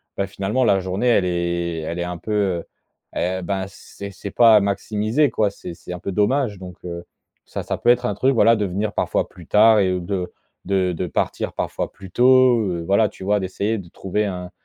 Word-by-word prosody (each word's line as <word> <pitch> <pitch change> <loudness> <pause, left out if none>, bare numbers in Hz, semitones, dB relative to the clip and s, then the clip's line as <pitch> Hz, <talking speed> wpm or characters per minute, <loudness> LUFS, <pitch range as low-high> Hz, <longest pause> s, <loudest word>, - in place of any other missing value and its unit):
bah, 100 - -1
finalement 100 +6 -1
la 100 -5 +4
journée, 95 +6 -2
elle 100 -6 +4
est 85 -1 -1
elle 85 +2 -4
est - - 0
un 90 0 -4
peu, 110 - -7
heu, 95 -5 0 0.5
eh 95 +1 -1
ben, 95 +1 -2
c'est 100 +1 -10
c'est 100 - -7
pas 115 -3 +6
maximisé 105 +7 0
quoi. 105 -2 +1
C'est 90 -3 -9
c'est 85 +1 -11
un 90 - -6
peu 95 - -4
dommage 105 +2 +1
donc 90 -2 -9
heu, 85 0 -6 0.4
ça, - - -5
ça - - -3
peut - - +1
être 125 0 +4
un 105 - 0
truc, 130 +6 +2
voilà, 115 0 +5
de 105 - -1
venir 100 +3 -2
parfois - - 0
plus 90 -3 -14
tard 110 +1 +6
et 95 -2 +2
ou 90 - -1
de 90 0 -3 0.3
de 95 -2 +1
de 90 +2 -3
partir - - -2
parfois - - -3
plus 95 -2 -13
tôt, 130 -1 +5
heu, 90 -5 -2
voilà, 100 +2 +3
tu - - -12
vois? 105 +1 +2
D'essayer 100 +4 -2
de 90 -3 -11
trouver 95 +4 -2
un 90 -2 -5
100 Hz, 220 wpm, -21 LUFS, 90-110 Hz, 0.5 s, pas